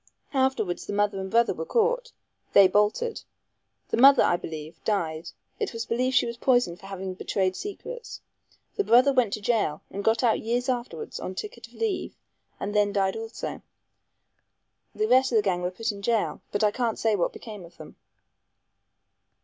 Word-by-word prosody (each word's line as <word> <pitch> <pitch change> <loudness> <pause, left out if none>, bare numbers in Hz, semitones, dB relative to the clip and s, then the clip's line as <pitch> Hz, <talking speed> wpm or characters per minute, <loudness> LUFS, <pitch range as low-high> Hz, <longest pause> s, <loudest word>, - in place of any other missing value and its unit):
Afterwards 265 -9 0
the - - -3
mother 205 -1 +1
and 190 0 -4
brother 235 +3 +3
were - - -5
caught. - - +1 0.4
They 200 -1 +8
bolted. 210 - +1 0.7
The - - 0
mother, 275 +3 +8
I - - +3
believe, 160 -1 -8
died 165 -6 -1 0.3
it 430 - -2
was 230 0 -4
believed 255 +2 0
she - - +5
was 235 0 -5
poisoned 245 -9 +2
for 195 - -12
having 190 -1 -5
betrayed 185 0 -1
secrets. 470 - -7 0.6
The 410 - +2
brother 255 -2 +5
went 250 -6 +2
to 215 - -3
jail, 205 -9 0 0.2
got 225 +3 +2
out 230 -2 +3
years 245 +3 -1
afterwards 240 -11 -3
on 185 - -5
ticket 425 - -7
of - - -22
leave, 445 -4 -2 0.4
and 205 - -3
then 205 -1 +3
died 195 -1 +1
also. 225 +1 -6 1.3
The 430 - 0
rest 260 - +4
of - - +2
the 215 - +4
gang 180 -3 0
were 180 - -1
put 225 +5 -3
in 200 -1 -9
jail, 225 +1 0
but 205 - 0
I 210 - +4
can't 235 -1 -1
say 220 -2 +2
what 180 - 0
became 210 -5 -9
of 170 0 -15
them." 155 - -12
220 Hz, 180 wpm, -26 LUFS, 190-255 Hz, 1.3 s, They